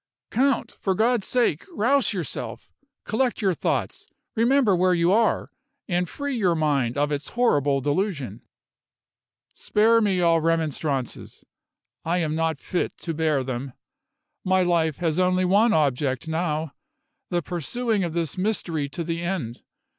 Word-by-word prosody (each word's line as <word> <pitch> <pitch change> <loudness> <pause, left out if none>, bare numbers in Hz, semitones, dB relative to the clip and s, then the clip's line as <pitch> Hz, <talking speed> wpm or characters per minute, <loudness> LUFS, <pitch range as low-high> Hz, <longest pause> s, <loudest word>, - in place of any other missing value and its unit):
"Count! 270 +2 +1
for 190 -2 0
God's 230 0 +1
sake, 235 - +1
rouse 275 -1 +2
yourself! 180 -7 -5 0.3
Collect 245 +2 0
your 195 -4 +2
thoughts - - -2 0.2
remember 235 -2 +3
where 180 +1 +3
you 170 +1 +2
are 225 +3 +2 0.4
and 180 -1 0
free 285 -2 -4
your 185 -7 +2
mind 145 -6 0
of 145 +1 +1
its 145 0 -3
horrible 145 - +2
delusion." 145 - -2 1.1
"Spare 225 +2 +3
me 195 -4 +1
all 165 -2 +3
remonstrances; 155 -5 -2 0.6
I 170 +2 0
am 160 -3 0
not 160 0 0
fit 180 - -3
to 165 - -4
bear 155 -3 +1
them. 130 0 -5 0.7
My 185 -1 +3
life 165 -4 +1
has 165 -1 0
only 185 0 +2
one 205 +5 +4
object 140 - +1
now 160 -2 -2 0.6
the 175 -2 -1
pursuing 205 - -1
of 170 -2 -3
this 170 0 -2
mystery 170 -8 -1
to 160 +4 -4
the 165 0 -3
end. 170 -10 -3
175 Hz, 140 wpm, -24 LUFS, 150-205 Hz, 1.1 s, one